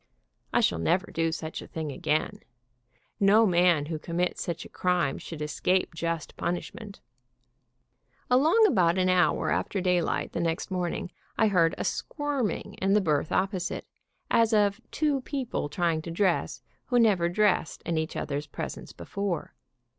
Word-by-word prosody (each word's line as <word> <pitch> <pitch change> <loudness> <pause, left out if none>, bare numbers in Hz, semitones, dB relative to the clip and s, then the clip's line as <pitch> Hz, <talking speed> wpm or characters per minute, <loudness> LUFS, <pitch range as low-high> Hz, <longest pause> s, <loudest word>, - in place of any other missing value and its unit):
I - - +3
shall - - +2
never 180 - +1
do 165 0 0
such 160 -1 -5
a - - -10
thing 160 -2 -4
again. 155 +3 -1 0.8
No 210 +2 +6
man 175 -5 +3
who 155 0 -4
commits 175 +3 -2
such 170 -1 -4
a - - -11
crime 180 -6 0
should 155 -3 -6
escape 180 +5 0
just 165 -1 -3
punishment. 200 +4 -5 1.3
Along 310 - +5
about 180 - +3
an 185 0 +2
hour 185 0 +2
after 200 - -1
daylight 180 -2 0
the - - -3
next 165 +2 -2
morning 180 +1 -2 0.3
I 220 -2 +4
heard 170 -4 +3
a - - -2
squirming 290 -7 -2
in 195 +1 +2
the 210 - +5
berth 155 -5 0
opposite, 185 -1 -1 0.5
as 230 -1 +4
of 205 +1 +2
two 290 -3 0
people 255 - -3
trying 165 0 0
to 170 - -8
dress 180 +1 0 0.2
who 245 - +1
never 200 -7 +4
dressed 200 -2 +1
in 165 -1 0
each 160 0 -4
other's 145 0 -3
presence - - -6
before. 200 -4 -4
180 Hz, 155 wpm, -27 LUFS, 165-205 Hz, 1.3 s, No